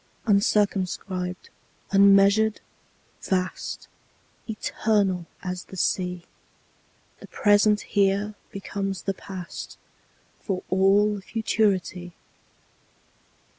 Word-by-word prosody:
Uncircumscribed, 195 -3 0 0.4
unmeasured, 200 +2 +5 0.6
vast, 185 -1 -3 0.6
Eternal 205 -4 0 0.2
as 180 -1 -4
the 190 - -11
Sea, 180 -1 -1 1.0
The - - -12
present 210 0 +3
here 200 +1 +1 0.2
becomes 195 -2 -4
the 195 - -1
past, 185 -3 -8 0.6
For 190 -3 -3
all 200 +2 +3
futurity. 190 -5 -1
195 Hz, 70 wpm, -25 LUFS, 185-205 Hz, 1.0 s, unmeasured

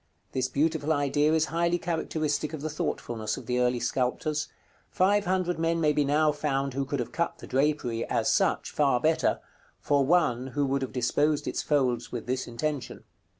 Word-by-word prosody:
This 130 -1 0
beautiful 155 +1 0
idea 145 0 +2
is 160 0 +3
highly 170 +1 +2
characteristic 160 -3 -2
of 155 - -5
the 155 - -2
thoughtfulness 110 -7 -3
of - - -9
the 125 0 0
early 125 0 +2
sculptors: 130 +5 -1 0.4
five 205 +2 +2
hundred 180 -2 0
men 165 0 +1
may 150 -2 +3
be 150 - +2
now 150 +2 +3
found 140 -2 -1
who 135 +1 -1
could 140 0 -3
have 120 - -3
cut 170 +1 -1
the - - -10
drapery, 130 -4 0
as - - 0
such, - - +1
far 140 -4 +2
better, 160 +5 +2 0.4
for 140 -1 +2
one 130 -5 +2
who 145 - +3
would 135 0 0
have 130 - -3
disposed 145 +4 +1
its - - -1
folds 130 -5 0
with 120 -2 -5
this 130 +1 -2
intention. 135 +4 -4
145 Hz, 185 wpm, -28 LUFS, 130-155 Hz, 0.4 s, is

